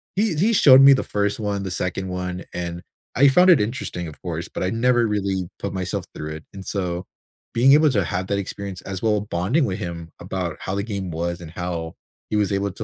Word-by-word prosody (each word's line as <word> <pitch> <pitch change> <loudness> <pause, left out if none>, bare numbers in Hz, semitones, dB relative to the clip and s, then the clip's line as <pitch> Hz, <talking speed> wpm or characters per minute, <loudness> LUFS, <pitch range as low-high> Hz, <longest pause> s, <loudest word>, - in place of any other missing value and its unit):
he 205 -2 +1
he 200 +9 +2
showed 135 -9 +8
me 135 0 +9
the 130 - +1
1st 105 +1 -1
one, 100 -2 -2
the 95 - -4
2nd 90 +1 -2
one, 90 0 -4
and 85 0 -4 0.3
I 140 +3 +6
found 180 +7 +6
it 155 -11 +5
interesting, 105 -7 -3
of 75 - -11
course, 85 -2 -4
but - - -5
I 95 - +1
never 120 +1 +3
really 100 -4 -1
put - - -4
myself 95 -2 -3
through 75 0 -5
it. 80 - -14
And 95 -1 -9
so, 90 -3 -3 0.5
being 130 +4 +5
able 150 0 +5
to 100 -6 +2
have 90 +2 -2
that 100 +1 0
experience 100 -1 -6
as 95 -1 -6
well 105 -2 +2
bonding 105 - 0
with 95 -5 -2
him 85 -4 -6
about 90 -4 -4
how 95 - -3
the 100 - 0
game 100 -5 -4
was 85 +2 -3
and 80 -2 -9
how 85 -2 -4 0.4
he - - 0
was 105 -1 +1
able 100 0 0
to 110 - -7
95 Hz, 230 wpm, -22 LUFS, 90-115 Hz, 0.5 s, me